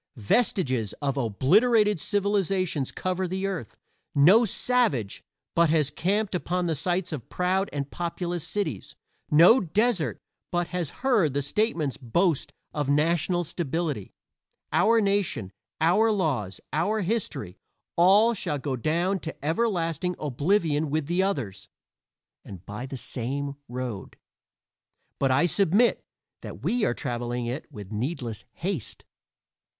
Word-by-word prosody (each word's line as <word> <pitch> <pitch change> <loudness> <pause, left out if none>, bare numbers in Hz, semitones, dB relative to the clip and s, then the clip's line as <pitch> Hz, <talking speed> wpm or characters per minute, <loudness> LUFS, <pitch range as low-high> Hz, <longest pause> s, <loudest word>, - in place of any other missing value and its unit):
Vestiges 130 - +1
of 140 -2 -2
obliterated 205 - +3
civilizations 195 -7 0
cover 185 0 -2
the 190 +2 -3
earth; 185 - -4 0.4
no 185 +12 +6
savage 215 - 0 0.3
but 170 -1 +4
has 150 -2 +2
camped 200 +7 0
upon 180 0 -1
the 165 - +1
sites 175 +4 -1
of 140 -7 -7
proud 185 +2 0
and 140 -1 -4
populous 175 -1 -3
cities; 200 -7 -3 0.3
no 170 - +7
desert 200 0 +1 0.3
but 175 -1 0
has 180 -5 -2 0.2
heard 200 - +3
the 145 - +1
statesman's 160 - -1
boast 155 +5 0 0.2
of 145 -2 -2
national 165 +4 +2
stability. 160 - -3 0.6
Our 230 0 +4
nation, 195 - 0 0.3
our 210 +8 +4
laws, 135 - -1
our 210 +8 +1
history 175 - -3 0.4
all 200 +7 +5
shall 150 -8 -2
go 135 -1 -3
down 170 - 0
to 160 -3 -8
everlasting 175 -2 0
oblivion 150 +2 0
with 155 +1 -1
the 175 +4 +1
others, 135 - -3 0.7
and 95 -2 -11
by 105 +6 -6
the 135 - -6
same 140 +4 -3 0.2
road. 120 -5 -5 1.0
But 135 - +2
I 130 +6 +4
submit 200 +6 +3 0.4
that - - -9
we 240 -2 +1
are 120 - 0
traveling 120 -2 -3
it 130 +6 -5
with 105 -6 -9
needless 120 -1 -4
haste. 175 - -4
165 Hz, 125 wpm, -26 LUFS, 135-195 Hz, 1.0 s, no